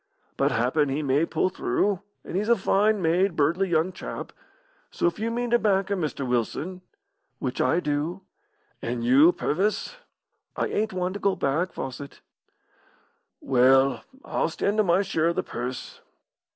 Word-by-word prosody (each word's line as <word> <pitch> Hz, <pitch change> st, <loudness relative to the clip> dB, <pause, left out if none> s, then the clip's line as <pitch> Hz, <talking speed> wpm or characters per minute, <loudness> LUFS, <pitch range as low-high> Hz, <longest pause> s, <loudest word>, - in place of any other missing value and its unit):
"But -, -, +1 dB
happen 130 Hz, +5 st, +1 dB
he 145 Hz, +3 st, -1 dB
may 145 Hz, +4 st, +2 dB
pull 165 Hz, +3 st, +1 dB
through, 195 Hz, +1 st, 0 dB, 0.2 s
and -, -, -6 dB
he's 210 Hz, +4 st, 0 dB
a 235 Hz, -, +6 dB
fine 205 Hz, 0 st, +2 dB
made, 175 Hz, +3 st, +2 dB
buirdly 170 Hz, +6 st, +1 dB
young 165 Hz, +2 st, +1 dB
chap, 185 Hz, -, -7 dB, 0.6 s
so -, -, -2 dB
if 170 Hz, +2 st, 0 dB
you 225 Hz, +1 st, -1 dB
mean 240 Hz, +1 st, -2 dB
to 240 Hz, -, +4 dB
back 195 Hz, -2 st, +1 dB
him, 195 Hz, -3 st, 0 dB
Mr. 145 Hz, -3 st, -3 dB
Wilson 145 Hz, +10 st, -2 dB, 0.6 s
"Which 130 Hz, -1 st, -3 dB
I 130 Hz, +7 st, +2 dB
do." 155 Hz, +4 st, -2 dB, 0.6 s
"And 120 Hz, 0 st, -3 dB
you, 135 Hz, +8 st, +6 dB
Purvis?" 205 Hz, -, -1 dB, 0.6 s
"I -, -, 0 dB
ain't 220 Hz, +1 st, -1 dB
one 185 Hz, 0 st, -2 dB
to 205 Hz, -, -5 dB
go 200 Hz, -2 st, +1 dB
back, 170 Hz, +3 st, 0 dB
Fawcett." 135 Hz, +2 st, -7 dB, 1.2 s
"Well, 135 Hz, +1 st, +4 dB, 0.2 s
I'll -, -, 0 dB
stan' 200 Hz, +5 st, -1 dB
to 215 Hz, -, +4 dB
my 185 Hz, +1 st, +3 dB
share 165 Hz, -4 st, 0 dB
of 170 Hz, -, 0 dB
the -, -, 0 dB
purse." 125 Hz, +1 st, -6 dB
170 Hz, 165 wpm, -25 LUFS, 140-195 Hz, 1.2 s, a